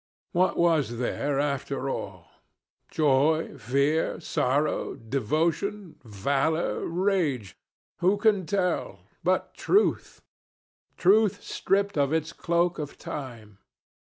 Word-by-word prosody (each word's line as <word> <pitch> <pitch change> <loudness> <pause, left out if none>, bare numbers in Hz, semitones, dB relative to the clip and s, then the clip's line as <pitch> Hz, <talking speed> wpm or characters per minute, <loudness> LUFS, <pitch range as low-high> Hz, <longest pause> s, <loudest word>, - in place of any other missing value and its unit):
What 185 +1 +2
was 155 -9 +2
there 135 +3 -1
after 140 -1 -2
all? 95 -9 -5 0.6
Joy, 150 +1 +2
fear, 140 +7 +1
sorrow, 145 -1 0
devotion, 160 - -2
valor, 140 - -1
rage 165 - 0 0.4
who 185 +4 +3
can 205 -4 +2
tell? 190 -3 -1 0.2
but - - 0
truth 410 +3 +1 0.7
truth 205 +2 +3
stripped 200 -4 0
of 140 +1 +2
its 160 0 -1
cloak 170 0 0
of 150 -1 -6
time. 115 -8 -8
155 Hz, 100 wpm, -27 LUFS, 135-180 Hz, 0.7 s, who